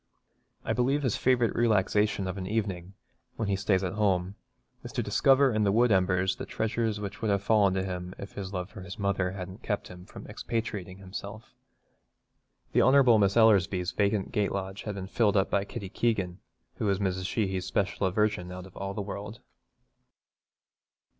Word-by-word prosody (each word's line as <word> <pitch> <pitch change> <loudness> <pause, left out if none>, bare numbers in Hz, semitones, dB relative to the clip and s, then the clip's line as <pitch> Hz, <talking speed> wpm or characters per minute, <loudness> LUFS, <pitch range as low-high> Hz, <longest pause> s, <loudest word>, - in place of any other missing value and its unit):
I - - 0
believe 135 +4 +1
his 125 -5 +1
favourite 120 -3 +2
relaxation 105 -3 +2
of 95 - -3
an 95 - -5
evening, 95 -4 -3 0.4
when 110 - -2
he 100 - +2
stays 95 -1 +1
at 90 -1 -2
home, 95 -3 +1 0.5
is - - -7
to - - -1
discover 135 -1 +4
in 110 0 +1
the 100 - +3
wood 120 +3 +4
embers 95 -1 +2
the - - -6
treasures 110 -1 -1
which 100 +2 -6
would 110 - 0
have 100 -1 +1
fallen 100 -3 +3
to 95 - 0
him 90 -1 -5
if 100 - -9
his 95 -2 -6
love 90 -1 -4
for 100 - -9
his 90 0 -8
mother 100 -2 0
hadn't 95 +1 -7
kept 105 -2 -3
him 90 0 -11
from - - -11
expatriating 105 -5 -4
himself. 100 +3 -8 1.2
The - - +5
Hon. 130 -4 +6
Miss 100 +1 +2
Ellersby's 95 -5 +4
vacant 100 -1 0
gate 105 -4 0
lodge 95 0 -4
has 105 -2 -3
been 95 -1 -5
filled 105 +1 +2
up 95 - +1
by 100 0 +1
Kitty 100 -3 -7
Keegan, 100 -5 -1 0.4
who 105 - 0
is 100 - +2
Mrs. 95 -1 -1
Sheehy's 95 -4 -1
special 95 +1 0
aversion 95 -2 0
out 90 0 -7
of 95 - -15
all 100 0 -5
the 105 - -2
world. 100 +3 -7
100 Hz, 185 wpm, -28 LUFS, 95-110 Hz, 1.2 s, Hon